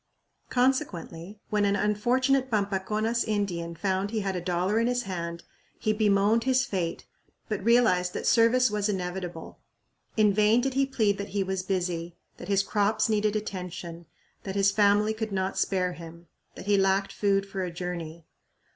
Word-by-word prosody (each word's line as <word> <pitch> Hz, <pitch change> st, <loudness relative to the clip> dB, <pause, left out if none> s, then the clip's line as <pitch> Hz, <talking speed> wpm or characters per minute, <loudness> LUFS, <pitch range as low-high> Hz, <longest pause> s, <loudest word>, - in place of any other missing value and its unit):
Consequently, 215 Hz, -, -1 dB
when 210 Hz, -1 st, +2 dB
an 200 Hz, 0 st, +2 dB
unfortunate 250 Hz, +6 st, +1 dB
Pampaconas 215 Hz, +2 st, 0 dB
Indian 180 Hz, -6 st, -2 dB
found 190 Hz, +2 st, -1 dB
he 220 Hz, 0 st, -2 dB
had 195 Hz, -1 st, -2 dB
a 180 Hz, -, -2 dB
dollar 180 Hz, +4 st, 0 dB
in 230 Hz, -, +2 dB
his 245 Hz, 0 st, 0 dB
hand, 170 Hz, -3 st, -5 dB, 0.3 s
he 215 Hz, -, 0 dB
bemoaned 210 Hz, +1 st, +3 dB
his 260 Hz, 0 st, +3 dB
fate, 180 Hz, -9 st, -3 dB, 0.4 s
but 210 Hz, -4 st, -3 dB
realized 215 Hz, -6 st, +3 dB
that -, -, -4 dB
service 235 Hz, +1 st, +4 dB
was 210 Hz, 0 st, 0 dB
inevitable. 180 Hz, -3 st, -5 dB, 0.6 s
In 210 Hz, -2 st, +4 dB
vain 215 Hz, +3 st, +4 dB
did 265 Hz, +2 st, -1 dB
he 270 Hz, +1 st, +2 dB
plead 215 Hz, -7 st, +1 dB
that 200 Hz, -, -5 dB
he 195 Hz, -, +2 dB
was 190 Hz, 0 st, -2 dB
"busy," 175 Hz, -3 st, -2 dB, 0.2 s
that -, -, -9 dB
his 195 Hz, -1 st, +2 dB
"crops 210 Hz, +2 st, +1 dB
needed 215 Hz, -1 st, +1 dB
attention," 180 Hz, -5 st, -6 dB, 0.3 s
that 190 Hz, -1 st, -6 dB
his 200 Hz, 0 st, +3 dB
"family 205 Hz, +1 st, +3 dB
could 220 Hz, -1 st, -4 dB
not 190 Hz, 0 st, -1 dB
spare 180 Hz, -2 st, 0 dB
him," 170 Hz, 0 st, -11 dB, 0.3 s
that -, -, -9 dB
"he 205 Hz, -1 st, +3 dB
lacked 195 Hz, 0 st, +1 dB
food 195 Hz, -1 st, +1 dB
for 195 Hz, -1 st, -4 dB
a 180 Hz, -, -3 dB
journey." 170 Hz, -2 st, -6 dB
200 Hz, 165 wpm, -27 LUFS, 180-215 Hz, 0.6 s, service